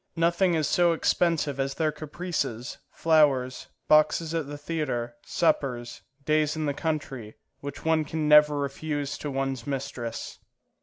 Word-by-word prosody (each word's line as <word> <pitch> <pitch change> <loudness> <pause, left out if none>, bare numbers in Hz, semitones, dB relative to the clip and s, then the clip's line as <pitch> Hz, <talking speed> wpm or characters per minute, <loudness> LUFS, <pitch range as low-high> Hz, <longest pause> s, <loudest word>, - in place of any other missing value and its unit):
Nothing 170 +2 +2
is 155 -2 +1
so 175 +1 +3
expensive 160 -4 +1
as 135 0 -1
their 155 -2 +1
caprices, 150 -7 -4
flowers, 140 -6 +2 0.2
boxes 155 +1 +4
at 165 -4 -1
the 145 0 -6
theatre, 145 -6 -3
suppers, 125 -7 -1 0.2
days 155 0 +2
in 155 -1 -2
the 145 - 0
country, 140 -8 -4 0.2
which 140 +1 -8
one 160 -1 +3
can 155 0 -2
never 150 0 +6
refuse 145 0 -3
to 150 - -4
one's 135 -2 -3
mistress. 135 -4 -5
150 Hz, 140 wpm, -27 LUFS, 135-160 Hz, 0.2 s, never